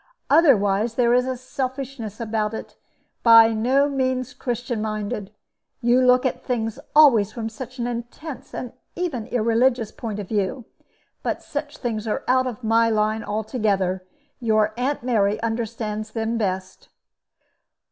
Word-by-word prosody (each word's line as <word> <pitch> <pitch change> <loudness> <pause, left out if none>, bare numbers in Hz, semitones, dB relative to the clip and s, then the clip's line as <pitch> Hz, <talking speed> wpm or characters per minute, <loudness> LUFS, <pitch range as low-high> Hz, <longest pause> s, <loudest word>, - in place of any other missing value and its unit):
Otherwise 225 - +4
there 240 -1 +3
is 250 +1 +3
a 260 -1 -2
selfishness 255 -3 -5
about 220 -1 -1
it - - -8 0.5
by 230 -1 +7
no 260 +6 +2
means 260 -1 -1
Christian 240 -3 -3
minded. 215 -1 -3 0.5
You 240 +1 +3
look 250 +1 +4
at 260 - -1
things 225 -1 -2 0.2
always 255 -10 +6
from 225 -2 -4
such 255 +3 -9
an 240 - -2
intense 245 +5 -6
and 250 - -6 0.2
even 290 -11 -3
irreligious 235 0 +1
point 220 -3 -5
of 205 -2 -5
view. 210 +4 -1 0.6
But - - -3
such - - -5
things 225 -3 -3
are 215 - -1
out 255 0 +3
of 245 -1 -6
my 230 +1 +3
line 215 0 +1
altogether. 205 -4 -1 0.4
Your 215 -3 +2
Aunt 255 +2 -1
Mary 215 -4 +1
understands 225 -2 -3
them 225 +1 -2
best." 190 -4 -3
230 Hz, 140 wpm, -23 LUFS, 215-255 Hz, 0.6 s, by